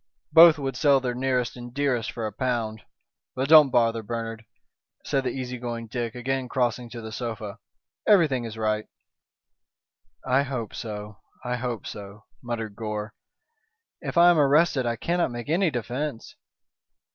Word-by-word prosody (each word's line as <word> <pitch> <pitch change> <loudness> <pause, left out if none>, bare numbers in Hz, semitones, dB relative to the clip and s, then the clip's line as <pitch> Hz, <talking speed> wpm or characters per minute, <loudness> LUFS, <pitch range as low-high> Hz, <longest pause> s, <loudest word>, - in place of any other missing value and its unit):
Both 165 0 +9
would 135 -3 -3
sell 140 0 +4
their 125 -2 -2
nearest 125 -1 -1
and 120 0 -9
dearest 130 -4 0
for 115 -2 -4
a 105 - -4
pound. 115 -2 -2 0.5
But 130 +1 -1
don't 155 -3 +9
bother, 115 -2 +2
Bernard," 115 0 -5 0.6
said 135 - 0
the 130 - -1
easy 125 -1 -5
going 120 -1 -4
Dick, 115 +1 -4
again 130 +1 -2
crossing 125 -2 -1
to 115 0 -8
the 110 0 -8
sofa, 110 -2 -5 0.5
"everything 160 - +4
is 115 -1 -7
right." 110 -1 -1 1.4
"I 130 +2 +3
hope 130 -6 -4
so, 105 -2 -7 0.3
I 125 0 -1
hope 120 -3 -4
so," 100 0 -9 0.2
muttered 115 -4 -4
Gore. 105 0 -4 0.9
"If - - -5
I 175 +1 +8
am 170 - +3
arrested 145 -2 +3
I 115 - 0
cannot 170 +8 0
make 120 +1 -7
any 175 +3 +3
defence." 125 0 -4
120 Hz, 155 wpm, -25 LUFS, 115-135 Hz, 1.4 s, Both